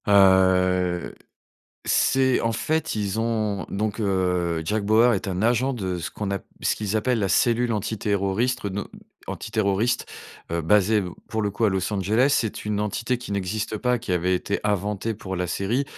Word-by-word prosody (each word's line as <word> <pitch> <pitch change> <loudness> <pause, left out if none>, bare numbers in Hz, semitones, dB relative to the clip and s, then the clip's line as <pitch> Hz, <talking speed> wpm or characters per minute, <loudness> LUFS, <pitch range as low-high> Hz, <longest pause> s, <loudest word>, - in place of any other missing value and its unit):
Heu, 95 -2 +4 0.7
c'est 130 -1 +3
en 115 - +1
fait 160 +7 -1
ils 105 -1 -2
ont 110 -4 -1
donc, 105 +1 -2
heu, 90 -4 0
Jack 105 +4 -1
Bauer 115 +3 +5
est 100 - -3
un 95 -2 -2
agent 120 +4 +2
de 95 -7 -3
ce 85 - -5
qu'on 105 -2 -4
ap 100 -1 -3 0.2
ce - - +1
qu'ils 105 0 -2
appellent 120 +2 +1
la 100 -2 0
cellule 120 0 +2
antiterroriste 105 +2 -1
no 100 +1 -4 0.4
antiterroriste, 110 +2 -1 0.4
heu, 85 0 0
basée 105 +4 +3 0.3
pour 110 -1 -2
le 105 - 0
coup 105 +3 -1
à - - +2
Los 95 +2 -1
Angeles. 105 +6 +2
C'est 110 -4 -3
une 105 -1 -1
entité 115 +4 -1
qui 120 - -9
n'existe 100 +3 -2
pas, 125 +1 +1
qui 115 -5 -4
avait 90 +1 +1
été 100 +3 -1
inventée 105 +1 -1
pour 95 -2 -6
la 90 0 -1
série. 105 +10 -1
105 Hz, 175 wpm, -24 LUFS, 95-115 Hz, 0.7 s, Bauer